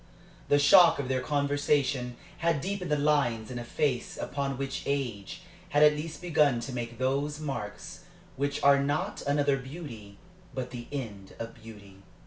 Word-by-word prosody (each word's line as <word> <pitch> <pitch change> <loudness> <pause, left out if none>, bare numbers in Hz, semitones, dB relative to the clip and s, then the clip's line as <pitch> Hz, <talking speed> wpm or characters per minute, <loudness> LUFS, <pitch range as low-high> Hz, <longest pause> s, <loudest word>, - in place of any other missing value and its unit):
The 145 - +5
shock 170 +4 +7
of 140 -2 -3
their 130 -1 +1
conversation 140 -3 0 0.2
had 165 -3 +2
deepened 190 +3 -3
the 150 - +3
lines 140 -7 +1
in 125 - -4
a - - -5
face 130 +1 -1
upon 140 -2 -2
which 135 0 -3
age 125 -8 -3 0.3
had 145 -3 +4
at 150 0 +7
last 155 +1 -6
begun 150 -7 +3
to 130 +2 -6
make 120 -1 -5
those 140 +4 -1
marks 120 -9 -6 0.3
which 140 +1 -2
are 140 0 +6
not 180 +9 -1
another 145 -1 +2
beauty, 125 -8 -9 0.4
but 125 -1 -4
the 120 -1 -7
end 105 -9 -6
of 115 0 -6
beauty. 105 -4 -13
140 Hz, 160 wpm, -29 LUFS, 120-145 Hz, 0.4 s, shock